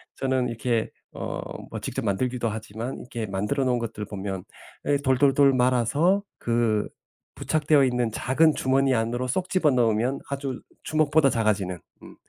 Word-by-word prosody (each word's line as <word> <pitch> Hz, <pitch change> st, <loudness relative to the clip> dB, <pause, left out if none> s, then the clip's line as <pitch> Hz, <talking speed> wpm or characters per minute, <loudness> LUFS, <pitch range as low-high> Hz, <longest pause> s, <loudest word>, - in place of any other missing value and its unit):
저는 130 Hz, -2 st, 0 dB
이렇게 115 Hz, -1 st, -1 dB, 0.2 s
어 -, -, -4 dB, 0.3 s
뭐 -, -, -5 dB
직접 -, -, -4 dB
만들기도 120 Hz, +4 st, 0 dB
하지만 110 Hz, +3 st, -5 dB
이렇게 120 Hz, -2 st, -5 dB
만들어 105 Hz, +8 st, -1 dB
놓은 125 Hz, -1 st, +1 dB
것들 110 Hz, -2 st, -5 dB
보면 95 Hz, -2 st, -5 dB, 0.4 s
예 145 Hz, -, +2 dB
돌돌돌 135 Hz, 0 st, +4 dB
말아서 130 Hz, -, +2 dB
그 115 Hz, -3 st, +1 dB, 0.5 s
부착되어 150 Hz, -2 st, +2 dB
있는 125 Hz, -3 st, +1 dB
작은 150 Hz, +7 st, +2 dB
주머니 135 Hz, 0 st, +2 dB
안으로 120 Hz, +3 st, -1 dB
쏙 180 Hz, +8 st, -2 dB
집어 165 Hz, -6 st, +3 dB
넣으면 120 Hz, +1 st, +1 dB
아주 135 Hz, -2 st, -4 dB, 0.2 s
주먹보다 155 Hz, -2 st, +3 dB
작아지는 100 Hz, -6 st, 0 dB, 0.2 s
음 -, -, -12 dB
125 Hz, 325 characters per minute, -25 LUFS, 115-140 Hz, 0.5 s, 돌돌돌